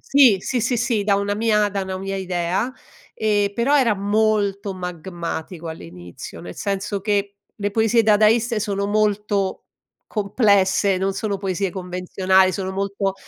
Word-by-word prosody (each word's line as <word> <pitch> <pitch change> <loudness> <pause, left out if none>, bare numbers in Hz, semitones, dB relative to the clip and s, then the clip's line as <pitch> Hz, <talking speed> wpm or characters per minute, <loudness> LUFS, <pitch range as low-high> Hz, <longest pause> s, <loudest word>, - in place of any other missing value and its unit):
Sì, 270 -7 +5
sì, 245 +5 -1
sì, 245 +2 0
sì, 230 -2 0
da 200 -1 +3
una 200 0 -1
mia 210 -1 +2
da 200 -1 -3
una 190 0 -4
mia 195 +1 -4
idea. 185 +5 -1 0.4
Ehm, 205 -2 +1
però 260 +6 +2
era 235 -5 +3
molto 205 -1 0
magmatico 175 -1 -6
all'inizio, 85 - -9
nel 90 +1 -9
senso 200 0 -3
che 200 0 -1 0.2
le 205 -1 -2
poesie 225 +2 +3
dadaiste 220 +2 +3
sono 200 -2 -1
molto 210 -1 0 0.4
complesse, 200 -2 +2
non 195 +1 0
sono 200 0 -2
poesie 195 0 -2
convenzionali, 185 +1 +1
sono 190 -1 -3
molto 195 0 -2
200 Hz, 145 wpm, -21 LUFS, 190-215 Hz, 0.4 s, Sì